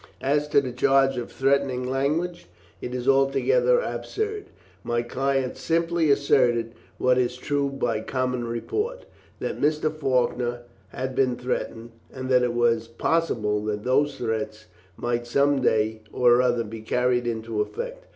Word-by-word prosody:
As 145 +2 +1
to 140 - +4
the 130 -2 -4
charge 135 +2 +3
of 120 - -5
threatening 135 -1 +1
language, 155 +7 -1 0.3
it 125 - -5
is 125 0 -4
altogether 275 - +3
absurd. 430 -3 -3 0.4
My 120 0 -1
client 135 +1 -1
simply 165 -1 +1
asserted 120 -5 +3 0.2
what 125 0 +3
is 125 0 0
true 140 +1 -1
by 120 -5 -1
common 125 0 -2
report 420 - -3 0.3
that - - -4
Mr. 150 +1 +1
Faulkner 125 -4 0 0.3
had 130 +6 -5
been 130 -1 +2
threatened, 120 -2 -4 0.2
and 130 0 -6
that 125 -1 +5
it 125 -1 0
was 115 -1 +2
possible 115 -5 0
that 105 -1 -3
those 140 +4 +1
threats 110 -2 -3 0.3
might 120 0 -2
some 140 +2 +2
day 110 -2 +1
or 120 0 +4
other 120 -2 +1
be 110 +1 -8
carried 125 +2 +1
into 115 -2 -2
effect. - - -5
125 Hz, 145 wpm, -25 LUFS, 120-140 Hz, 0.4 s, that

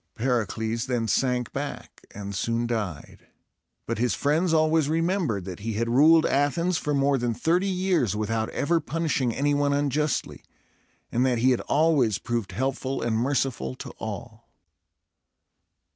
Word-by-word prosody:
Pericles 115 -1 -1
then 120 -3 -1
sank 125 +2 0
back, - - -6
and 100 0 -7
soon 115 +4 -1
died; 105 -10 -5 0.6
but - - -3
his 125 +1 +1
friends 160 +5 +1
always 155 -1 +3
remembered 165 - 0
that 95 -2 -7
he 110 +2 -3
had 115 +3 -1
ruled 155 +7 +5
Athens 160 +5 +1
for 150 -1 -1
more 140 0 +2
than 120 -1 -1
thirty 175 - +1
years 180 - +1
without 110 +1 -1
ever 170 +3 +1
punishing 150 -5 -1
any 145 +5 0
one 145 0 +1
unjustly, 145 +1 -1 0.7
and 120 - +1
that 130 -2 +2
he 125 +3 +3
had 125 - +1
always 145 -9 +2
proved 115 -2 -3
helpful 135 +1 -2
and 115 -1 0
merciful 120 - -1
to - - -8
all. - - -7
130 Hz, 145 wpm, -26 LUFS, 115-150 Hz, 0.7 s, ruled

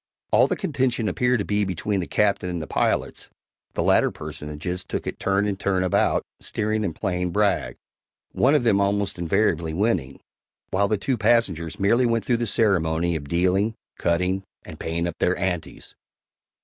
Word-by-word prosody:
All - - +5
the - - 0
contention 125 -6 -1
appeared 125 +3 +1
to 105 - -2
be 105 0 +1
between 100 +2 -1
the 90 - -3
Captain 100 -3 +1
and 90 -1 -3
the 80 - -5
pilots - - -1 0.5
(the - - 0
latter - - +4
personages 80 +5 -5
took - - -4
it - - -5
turn 95 +1 +1
and 100 -2 -2
turn 95 -2 +1
about, 90 - +2 0.2
steering 110 0 -1
and 90 -6 -2
playing 90 -3 -1
brag), 100 +2 +1 0.6
one 135 +4 +3
of 145 - +2
them 105 -4 +3
almost 100 -2 0
invariably 85 -3 +1
winning, 90 - 0 0.5
while 100 +2 +2
the 105 - +1
two 120 +4 -1
passengers 100 -8 +1
merely 115 +6 +3
went 115 -1 0
through 120 - +2
the 120 0 -2
ceremony 85 -6 +1
of 70 -3 -5
dealing, 95 +6 +1 0.2
cutting, 90 +3 +1 0.2
and 80 - -10
paying 85 +1 -2
up 85 - -6
their 90 - +2
"anties." 90 -3 -4
95 Hz, 175 wpm, -24 LUFS, 85-110 Hz, 0.6 s, All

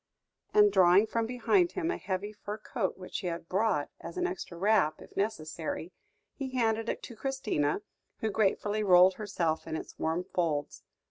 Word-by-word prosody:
and, 420 -1 +6
drawing 185 +3 +6
from 225 +1 -1
behind 335 - +2
him 350 -2 -1
a - - -2
heavy 200 +2 -3
fur 210 0 -6
coat, 215 -2 -3
which 185 -1 -5
he 185 - -4
had 170 -1 -4
brought 190 -6 +1
as - - -8
an 360 - +1
extra 365 - -5
wrap, 190 -4 +2
if - - -14
necessary, 170 -4 -3 0.4
he 265 -2 -5
handed 225 -1 +1
it - - -3
to 235 - -8
Christina, 215 - -1 0.3
who 220 - -1
gratefully 210 0 +1
rolled 185 -2 +7
herself 180 -6 -2
in 160 - -3
its - - -7
warm 160 +3 0
folds. 160 -6 -2
205 Hz, 175 wpm, -30 LUFS, 175-225 Hz, 0.4 s, rolled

